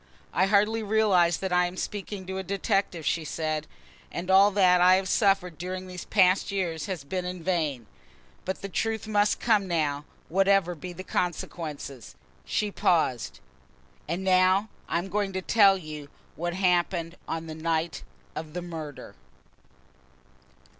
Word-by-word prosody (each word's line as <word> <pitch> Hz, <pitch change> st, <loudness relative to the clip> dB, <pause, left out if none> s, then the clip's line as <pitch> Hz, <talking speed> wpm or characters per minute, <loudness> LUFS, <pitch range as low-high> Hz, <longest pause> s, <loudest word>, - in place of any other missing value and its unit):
"I 190 Hz, +2 st, +3 dB
hardly 210 Hz, +3 st, +3 dB
realise 200 Hz, -6 st, +3 dB
that 190 Hz, -1 st, -3 dB
I 180 Hz, 0 st, +4 dB
am 180 Hz, +1 st, -8 dB
speaking 200 Hz, -1 st, -5 dB
to 190 Hz, +1 st, -4 dB
a -, -, -4 dB
detective," 195 Hz, -3 st, -1 dB
she 165 Hz, -, 0 dB
said, 155 Hz, 0 st, -3 dB, 0.4 s
"and 180 Hz, +2 st, -3 dB
all 195 Hz, +2 st, +7 dB
that 185 Hz, -3 st, +4 dB
I 180 Hz, +1 st, +7 dB
have 190 Hz, 0 st, 0 dB
suffered 195 Hz, -5 st, +2 dB
during 185 Hz, +1 st, -4 dB
these 180 Hz, -1 st, -8 dB
past 190 Hz, -1 st, +3 dB
years 175 Hz, -5 st, -2 dB
has 185 Hz, -7 st, -4 dB
been 180 Hz, +6 st, -3 dB
in 180 Hz, -1 st, -5 dB
vain; 155 Hz, -10 st, -1 dB, 0.6 s
but 190 Hz, -, -4 dB
the -, -, -2 dB
truth 220 Hz, +2 st, -2 dB
must 210 Hz, -1 st, +2 dB
come 215 Hz, -4 st, +2 dB
now, 150 Hz, -4 st, -1 dB, 0.2 s
whatever 195 Hz, 0 st, +3 dB
be 180 Hz, +2 st, -8 dB
the 185 Hz, +1 st, -8 dB
consequences." 150 Hz, -, -4 dB, 0.3 s
She 210 Hz, -1 st, -1 dB
paused. 125 Hz, -, 0 dB, 0.7 s
"And 175 Hz, +4 st, -2 dB
now 185 Hz, +2 st, +3 dB, 0.2 s
I -, -, +1 dB
am 175 Hz, +3 st, -2 dB
going 195 Hz, 0 st, -1 dB
to 190 Hz, -, -2 dB
tell 200 Hz, -2 st, +5 dB
you 155 Hz, -4 st, -8 dB, 0.3 s
what 175 Hz, +1 st, -3 dB
happened 175 Hz, -2 st, +1 dB
on 165 Hz, 0 st, -3 dB
the 160 Hz, -, -6 dB
night 160 Hz, -1 st, -2 dB, 0.3 s
of 155 Hz, -1 st, -6 dB
the 180 Hz, 0 st, -4 dB
murder." 160 Hz, -4 st, -7 dB
180 Hz, 155 wpm, -27 LUFS, 165-195 Hz, 0.7 s, all